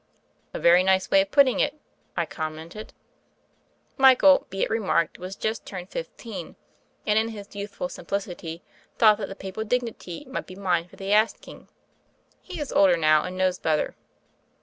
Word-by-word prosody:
"A - - -5
very 175 +1 +6
nice 190 0 +2
way 195 - +6
of 195 - -3
putting 275 +1 +4
it," 295 +1 0 0.4
I - - +1
com 155 -1 -5
mented. 170 +7 -9 1.1
Michael, 270 +1 +6
be 195 +1 -2
it - - -1
remarked, 200 -7 0
was 185 +2 -6
just 220 +1 -3
turned 180 -2 -8
fif - - -4
teen, - - -8 0.5
and, 210 +1 +3
in 220 - 0
his 205 -2 -10
youthful 200 -2 -4
simplicity, 175 -2 -5 0.3
thought 215 -2 +6
that - - -3
the 195 - -7
papal 195 +3 -5
dignity 225 -7 -3
might - - -5
be 185 - -10
mine 180 -3 0
for - - -17
the 195 +1 -2
asking. 215 +2 0 0.7
He 365 - -8
is 295 - -4
older 185 -3 +5
now, 155 -1 +4
and 185 0 -6
knows 185 -1 +1
better. 155 -1 0
195 Hz, 170 wpm, -25 LUFS, 180-220 Hz, 1.1 s, very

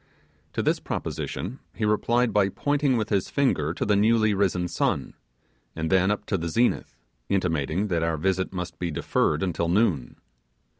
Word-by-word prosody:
To - - -1
this - - +1
proposition 90 - -4 0.2
he 110 - -1
replied 115 +3 +2
by 100 -2 +3
pointing 145 +3 +1
with 110 - -2
his 100 -3 0
finger 80 - +1
to - - -2
the 105 - +3
newly 110 +1 +3
risen 95 -3 +1
sun, - - -1 0.6
and 80 +1 -2
then 95 0 +4
up 105 0 -1
to 100 - -1
the 85 +1 -3
zenith, 120 +8 0 0.3
intimating 90 -1 0
that 85 -3 +1
our 80 -1 0
visit 95 +3 0
must 90 -2 -5
be 90 - -2
deferred 75 0 0
until 85 -2 -1
noon. 90 - +1
95 Hz, 165 wpm, -25 LUFS, 85-105 Hz, 0.6 s, then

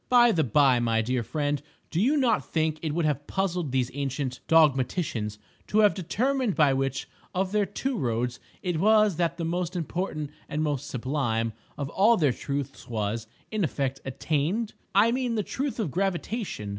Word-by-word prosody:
By 240 -1 +6
the 160 -6 +2
by, 130 0 +4
my 115 -1 +1
dear 125 +2 0
friend, 145 +3 -1 0.3
do 165 - +1
you 275 +8 +3
not 245 -6 +2
think 155 -1 -1
it 155 - -2
would 170 -2 +1
have 145 -1 -1
puzzled 180 -6 -1
these 130 -1 0
ancient 135 -1 -3
dogmaticians 135 - +2 0.3
to 215 - +3
have 210 -1 +5
determined 245 - 0
by 145 -4 +4
which 135 0 -1 0.3
of 185 +1 0
their 210 -1 +2
two 260 +7 -2
roads 120 -2 -1 0.2
it 175 -4 -1
was 215 -2 +4
that 170 -1 0
the 165 - -2
most 175 +1 -2
important 165 -3 -3 0.2
and 150 +1 -1
most 145 -4 -1
sublime 120 -3 -1 0.2
of 140 - -2
all 220 +7 +4
their 145 -7 +3
truths 140 +1 -4
was, 110 0 -2 0.2
in 215 -2 0
effect, 135 -4 -1
attained? 160 - -1 0.2
I 215 +4 +6
mean 250 -1 0
the 210 - 0
truth 270 +5 -3
of 190 -10 -1
Gravitation. 190 - -2
155 Hz, 175 wpm, -27 LUFS, 135-200 Hz, 0.3 s, By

